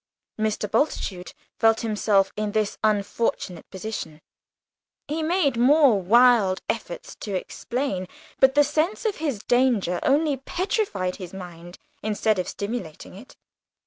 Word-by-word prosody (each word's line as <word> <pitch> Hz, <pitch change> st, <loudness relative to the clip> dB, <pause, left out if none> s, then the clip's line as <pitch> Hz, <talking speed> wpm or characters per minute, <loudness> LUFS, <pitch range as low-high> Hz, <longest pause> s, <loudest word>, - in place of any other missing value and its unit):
Mr. 215 Hz, -1 st, -1 dB
Bultitude 195 Hz, -7 st, -1 dB, 0.3 s
felt 225 Hz, -1 st, +4 dB
himself 210 Hz, -3 st, +1 dB
in 210 Hz, -1 st, -3 dB
this 215 Hz, -2 st, 0 dB
unfortunate 205 Hz, -3 st, -1 dB
position. 190 Hz, -6 st, -6 dB, 0.9 s
He 305 Hz, +3 st, -2 dB
made 315 Hz, -6 st, +1 dB
more 260 Hz, -4 st, +5 dB
wild 220 Hz, -1 st, +5 dB
efforts -, -, -4 dB
to 205 Hz, -3 st, -5 dB
explain, 195 Hz, 0 st, -3 dB, 0.3 s
but 265 Hz, 0 st, +5 dB
the 290 Hz, -, +6 dB
sense 310 Hz, -, -1 dB
of 425 Hz, -3 st, 0 dB
his 285 Hz, -10 st, -3 dB
danger 240 Hz, -8 st, +2 dB
only 290 Hz, +1 st, +2 dB
petrified 265 Hz, -, -2 dB
his 185 Hz, -1 st, -9 dB
mind 175 Hz, -1 st, -10 dB, 0.2 s
instead 215 Hz, -1 st, 0 dB
of 180 Hz, -, -2 dB
stimulating 200 Hz, -7 st, -6 dB
it. 210 Hz, +8 st, -13 dB
220 Hz, 125 wpm, -24 LUFS, 190-270 Hz, 0.9 s, the